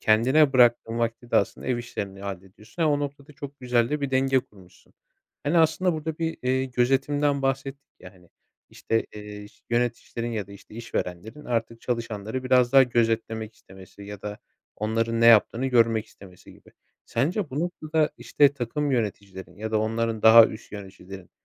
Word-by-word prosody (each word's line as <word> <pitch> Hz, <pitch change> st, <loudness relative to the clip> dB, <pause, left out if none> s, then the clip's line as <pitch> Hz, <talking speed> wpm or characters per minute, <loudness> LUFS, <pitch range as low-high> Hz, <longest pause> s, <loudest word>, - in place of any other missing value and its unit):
kendine 130 Hz, +7 st, +4 dB
bıraktığın 120 Hz, -2 st, +3 dB
vakti 115 Hz, +1 st, -3 dB
de -, -, +3 dB
aslında 100 Hz, -, -1 dB
ev 125 Hz, -1 st, 0 dB
işlerini 100 Hz, -5 st, -6 dB
hallediyorsun. 100 Hz, -, -7 dB
Ama, 155 Hz, -2 st, +3 dB
o 145 Hz, -, +1 dB
noktada, 145 Hz, 0 st, -6 dB
çok 140 Hz, -1 st, -10 dB
güzel 120 Hz, -2 st, +1 dB
de 150 Hz, 0 st, -1 dB
bir 140 Hz, -1 st, -2 dB
denge 135 Hz, 0 st, +2 dB
kurmuşsun. 95 Hz, -6 st, -21 dB, 0.5 s
Hani, 165 Hz, +4 st, +2 dB
aslında, 165 Hz, +3 st, +2 dB
burada 155 Hz, 0 st, -5 dB
bir, 165 Hz, 0 st, -2 dB
eee, 130 Hz, +1 st, +1 dB
gözetimden 135 Hz, +3 st, +1 dB
bahsettik 135 Hz, +1 st, -3 dB
ya, 90 Hz, -, -12 dB
hani, 90 Hz, -1 st, -22 dB, 0.4 s
işte, 115 Hz, 0 st, -2 dB
eee, 105 Hz, -1 st, -9 dB, 0.2 s
yöneticilerin 120 Hz, 0 st, -2 dB
ya 105 Hz, -3 st, -3 dB
da, 100 Hz, -, -13 dB
işte, 100 Hz, +1 st, -15 dB
işverenlerin 110 Hz, +4 st, -5 dB
artık 115 Hz, -1 st, -3 dB
çalışanları 115 Hz, 0 st, -4 dB
biraz 125 Hz, -1 st, +3 dB
daha 135 Hz, -1 st, +8 dB
gözetlemek 115 Hz, -2 st, -1 dB
istemesi 95 Hz, +1 st, -15 dB
ya 105 Hz, 0 st, -9 dB
da 105 Hz, 0 st, -6 dB, 0.4 s
onların 115 Hz, +2 st, -1 dB
ne 115 Hz, -, +5 dB
yaptığını 115 Hz, +2 st, +5 dB
görmek 115 Hz, -3 st, +2 dB
istemesi 90 Hz, -2 st, -16 dB
gibi. -, -, -20 dB, 0.3 s
Sence, 165 Hz, -, -1 dB
bu 140 Hz, +4 st, -3 dB
noktada, 155 Hz, -3 st, -1 dB
işte, 145 Hz, -2 st, +3 dB
takım 145 Hz, +2 st, -3 dB
yöneticilerin 100 Hz, -6 st, -4 dB
ya 110 Hz, +1 st, -5 dB
da 110 Hz, -, +1 dB
onların 115 Hz, 0 st, -2 dB
daha 110 Hz, 0 st, +9 dB
üst 110 Hz, -, -10 dB
yöneticilerin 95 Hz, -2 st, -10 dB
115 Hz, 165 wpm, -25 LUFS, 105-135 Hz, 0.5 s, daha